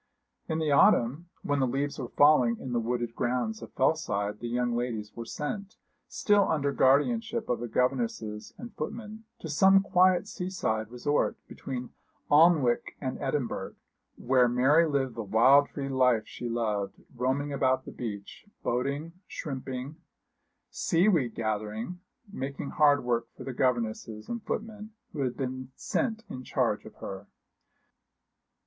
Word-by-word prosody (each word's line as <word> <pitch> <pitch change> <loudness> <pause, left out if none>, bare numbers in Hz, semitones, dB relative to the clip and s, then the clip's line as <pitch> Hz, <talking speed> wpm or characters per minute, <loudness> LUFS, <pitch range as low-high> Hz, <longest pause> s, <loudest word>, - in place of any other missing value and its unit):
In 160 - 0
the 155 -2 0
autumn, 140 +4 +4
when 145 -1 0
the 130 - +2
leaves 140 +4 -2
were 130 - -3
falling 130 -5 +4
in 125 - -6
the 120 - +2
wooded 120 0 -2
grounds 125 - -1
of - - -9
Fellside, 105 -10 0
the 120 - -5
young 120 0 0
ladies 115 -4 -3
were 115 - -6
sent, 200 - -5 0.3
still 205 -1 +3
under 145 -3 +1
guardianship 225 - +2
of 120 -1 -2
governesses 125 - -1
and 240 0 -9
footmen, 220 -1 -6 0.2
to - - -5
some 190 +6 +5
quiet 185 0 +3
seaside 180 - -2
resort 125 +5 0
between 125 -2 -6 0.4
Alnwick 150 -5 +4
and 130 -2 -4
Edinburgh, 135 -2 -2 0.4
where 125 0 +3
Mary 135 +7 +4
lived 135 -4 0
the 115 - -5
wild 120 +7 +5
free 140 -2 -5
life 125 -4 +3
she 120 - -6
loved, 105 -4 -1 0.2
roaming 130 +4 -1
about 130 -1 +1
the - - -8
beach, 105 - -7 0.2
boating, 140 +7 -1
shrimping, 135 0 -5 0.7
seaweed 165 - +2
gathering, 110 +8 -3 0.3
making 140 -1 -4
hard 145 -2 +4
work 120 -1 0
for - - -8
the 135 - -5
governesses 115 -3 -1
and 235 -1 -3
footmen 215 0 -5 0.2
who 150 - -6
had 125 -2 -1
been 130 -1 -4
sent 225 -2 -2
in 130 - -7
charge - - 0
of - - -12
her. 100 +1 -8
130 Hz, 140 wpm, -29 LUFS, 120-160 Hz, 0.7 s, some